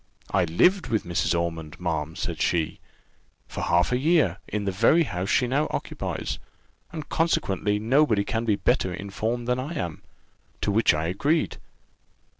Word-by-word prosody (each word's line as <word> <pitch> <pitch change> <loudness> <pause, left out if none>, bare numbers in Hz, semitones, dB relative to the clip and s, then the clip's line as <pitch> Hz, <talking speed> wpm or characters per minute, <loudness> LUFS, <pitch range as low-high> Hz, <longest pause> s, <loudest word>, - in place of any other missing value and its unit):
I - - +3
lived 175 - +3
with 110 -2 0
Mrs. 85 0 0
Ormond, 80 -3 -4
ma'am," 80 -3 -2
says - - -4
she, 80 -3 0 0.7
"'for - - -6
half 85 +4 +2
a 125 - +2
year, 145 - +3
in 105 -1 -3
the 100 - 0
very 115 - +4
house 95 - -3
she 125 - +3
now 140 +5 +1
occupies, - - -4 0.5
and 155 -2 -6
consequently 105 - +1
nobody 115 -1 +3
can 115 +2 -2
be 110 -3 +2
better 95 - +1
informed 110 +6 -3
than 125 0 +1
I 140 +6 -4
am:' 85 - -4 0.6
to 105 - +1
which 110 -3 +4
I 75 +1 -1
agreed. 145 - 0
105 Hz, 160 wpm, -25 LUFS, 85-130 Hz, 0.7 s, very